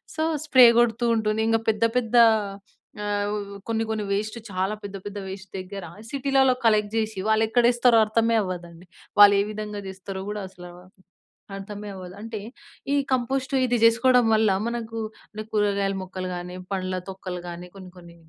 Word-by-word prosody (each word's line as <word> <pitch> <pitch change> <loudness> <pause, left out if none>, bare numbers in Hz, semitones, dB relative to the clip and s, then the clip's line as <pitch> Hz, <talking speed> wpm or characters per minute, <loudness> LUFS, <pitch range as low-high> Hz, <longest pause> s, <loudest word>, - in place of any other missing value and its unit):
So, 315 - 0 0.2
spray 260 -4 +7
కొడుతూ 240 0 +2
ఉంటుంది. 220 0 0
ఇంగ 225 0 +3
పెద్ద 215 +1 0
పెద్ద 240 -1 -1 0.9
ఆహ్, 205 0 -1
వ్ 205 -1 -4 0.2
కొన్ని 225 0 0
కొన్ని 215 -1 -2
వేస్టు 215 +3 -2
చాలా 190 +3 -1
పెద్ద 200 0 -6
పెద్ద 205 0 -6
వేస్ట్ 190 0 -9
దెగ్గర, 190 +1 -7 0.3
సిటీలల్లో 270 -1 +3
కలెక్ట్ 215 -1 +3
జేషి, 220 -3 -1
వాళ్ళెక్కడేస్తారో 235 +2 +4
అర్థమే 230 +1 +1
అవ్వదండి. 175 -2 -7 0.4
వాళ్ళేవిధంగా 205 +1 +4
జేస్తారో 190 0 -7
గూడా 210 0 -4
అసలా 180 -2 -12 0.9
అర్థమే 205 +1 -8
అవ్వదు. 180 -1 -9
అంటే, 225 -1 -6 0.6
ఈ - - +3 0.2
కంపోస్టు, 260 +2 -1
ఇది 245 -1 +1
జేసుకోడం 245 +2 +5
వల్ల, 215 -1 +3 0.2
మనకు 230 -1 -4 0.3
అంటే, 215 0 -6
కూరగాయల 200 -2 +1
మొక్కలు 185 0 -6
గానీ, 180 +1 -7 0.2
పండ్ల 185 -1 -2 0.2
తొక్కలు 185 -2 -6
గానీ, 175 +1 -8
కొన్ని 185 -2 -11
కొన్ని 170 -1 -14
210 Hz, 150 wpm, -24 LUFS, 190-230 Hz, 0.9 s, spray